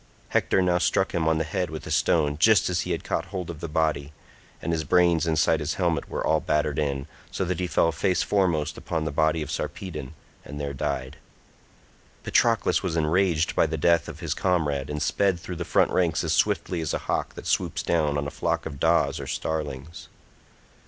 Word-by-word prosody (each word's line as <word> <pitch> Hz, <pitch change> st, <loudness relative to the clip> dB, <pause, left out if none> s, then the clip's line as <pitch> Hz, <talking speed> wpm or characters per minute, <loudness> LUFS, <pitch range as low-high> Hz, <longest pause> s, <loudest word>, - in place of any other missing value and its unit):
Hector 95 Hz, -, +2 dB
now 90 Hz, -1 st, +2 dB
struck 95 Hz, +2 st, +1 dB
him 80 Hz, -2 st, 0 dB
on 80 Hz, 0 st, +3 dB
the 80 Hz, -, +1 dB
head 85 Hz, +3 st, -2 dB
with 80 Hz, -1 st, -7 dB
a -, -, -6 dB
stone 75 Hz, -3 st, +2 dB
just 105 Hz, -2 st, +5 dB
as 85 Hz, -, +1 dB
he -, -, -4 dB
had -, -, -2 dB
caught -, -, -2 dB
hold 90 Hz, -4 st, -5 dB
of 80 Hz, -, -10 dB
the 85 Hz, -, -4 dB
body, 75 Hz, -2 st, -1 dB, 0.5 s
and 85 Hz, -, -3 dB
his 80 Hz, -1 st, -1 dB
brains 85 Hz, 0 st, +3 dB
inside 80 Hz, 0 st, +2 dB
his 75 Hz, +1 st, -2 dB
helmet 85 Hz, -3 st, 0 dB
were -, -, -3 dB
all -, -, +3 dB
battered 75 Hz, -1 st, 0 dB
in, 70 Hz, -2 st, -1 dB, 0.2 s
so 95 Hz, -, -2 dB
that 90 Hz, 0 st, -2 dB
he 90 Hz, -, -1 dB
fell 85 Hz, 0 st, +2 dB
face 80 Hz, +4 st, +1 dB
foremost 90 Hz, -7 st, 0 dB
upon 80 Hz, -2 st, -3 dB
the 80 Hz, -, -2 dB
body 80 Hz, +1 st, +1 dB
of -, -, -7 dB
Sarpedon, 80 Hz, -6 st, -5 dB, 0.3 s
and 75 Hz, 0 st, -8 dB
there 70 Hz, -1 st, -3 dB
died. 65 Hz, -1 st, -3 dB, 1.1 s
Patroclus 115 Hz, -2 st, +2 dB
was 90 Hz, -4 st, -2 dB
enraged 85 Hz, +1 st, +1 dB
by -, -, +3 dB
the 80 Hz, +1 st, -3 dB
death 85 Hz, +2 st, +3 dB
of -, -, -9 dB
his -, -, -1 dB
comrade, 75 Hz, -7 st, 0 dB
and 75 Hz, 0 st, -2 dB
sped 95 Hz, +3 st, +1 dB
through 90 Hz, 0 st, -7 dB
the 90 Hz, -, -3 dB
front -, -, +2 dB
ranks 85 Hz, -3 st, +1 dB
as 80 Hz, -1 st, 0 dB
swiftly 90 Hz, -3 st, +1 dB
as 80 Hz, -, -2 dB
a -, -, -5 dB
hawk -, -, -2 dB
that -, -, -9 dB
swoops -, -, 0 dB
down 75 Hz, -4 st, +1 dB
on 70 Hz, -, -2 dB
a 70 Hz, -, -4 dB
flock -, -, -1 dB
of 70 Hz, -4 st, -6 dB
daws 85 Hz, +3 st, +2 dB
or -, -, -6 dB
starlings. 75 Hz, 0 st, -4 dB
80 Hz, 210 wpm, -25 LUFS, 75-90 Hz, 1.1 s, just